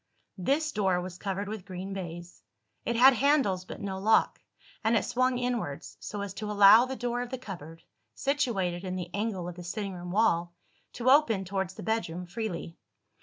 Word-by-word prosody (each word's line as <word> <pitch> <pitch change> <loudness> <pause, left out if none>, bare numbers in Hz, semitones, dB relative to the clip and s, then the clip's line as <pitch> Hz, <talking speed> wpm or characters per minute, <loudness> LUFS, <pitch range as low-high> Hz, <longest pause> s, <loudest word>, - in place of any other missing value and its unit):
This 295 - +1
door 190 -6 +1
was 180 0 -7
covered 200 0 -3
with 215 -2 -5
green 190 +1 -6
baize. 175 -2 -7 0.4
It 235 - 0
had 260 +3 +8
handles 250 -9 +2
but - - -8
no 195 -2 -4
lock; 220 +3 +3 0.4
and 225 +1 +3
it - - 0
swung 255 0 +1
inwards, 240 - -3
so 205 0 -5
as 200 -2 -5
to 210 +1 -5
allow 210 +3 +8
the 265 +1 -4
door 245 -1 -2
of 245 - -5
the 260 - -4
cupboard 165 - -9 0.3
(situated 215 -11 0
in 185 -1 -3
the 180 -1 -5
angle 200 -4 -2
of 175 0 -7
the 175 - -7
sitting 195 +2 -4
room 175 0 -7
wall) 175 -4 +1 0.4
to 250 +2 +2
open 230 -10 +4
towards 190 0 -3
the - - -8
bedroom 180 -6 -2
freely. 175 -3 -5
200 Hz, 185 wpm, -29 LUFS, 180-235 Hz, 0.4 s, had